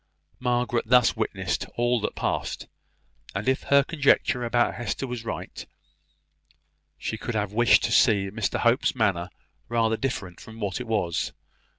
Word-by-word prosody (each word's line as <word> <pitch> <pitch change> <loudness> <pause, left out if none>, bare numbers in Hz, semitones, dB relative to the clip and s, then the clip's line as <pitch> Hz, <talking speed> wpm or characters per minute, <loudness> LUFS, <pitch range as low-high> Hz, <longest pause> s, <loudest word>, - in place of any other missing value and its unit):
Margaret 120 -1 0
thus 125 -3 +5
witnessed 100 -4 -2
all 120 0 +2
that - - -3
passed; - - -2 0.7
and 100 +5 -3
if 130 0 +2
her 140 0 +5
conjecture 140 -4 +2
about 120 0 +1
Hester 120 +3 -3
was 125 -3 -5
right, 115 - -6 1.3
she 110 - -4
could 120 - -4
have 105 -1 -1
wished 120 +2 +5
to - - 0
see 100 -5 +3
Mr 110 0 -1
Hope's 120 +3 +2
manner 95 -7 0 0.4
rather 115 -1 +1
different 100 -10 -4
from 110 0 -12
what 100 +1 -3
it 125 - -7
was. 100 -7 -1
115 Hz, 150 wpm, -26 LUFS, 105-125 Hz, 1.3 s, thus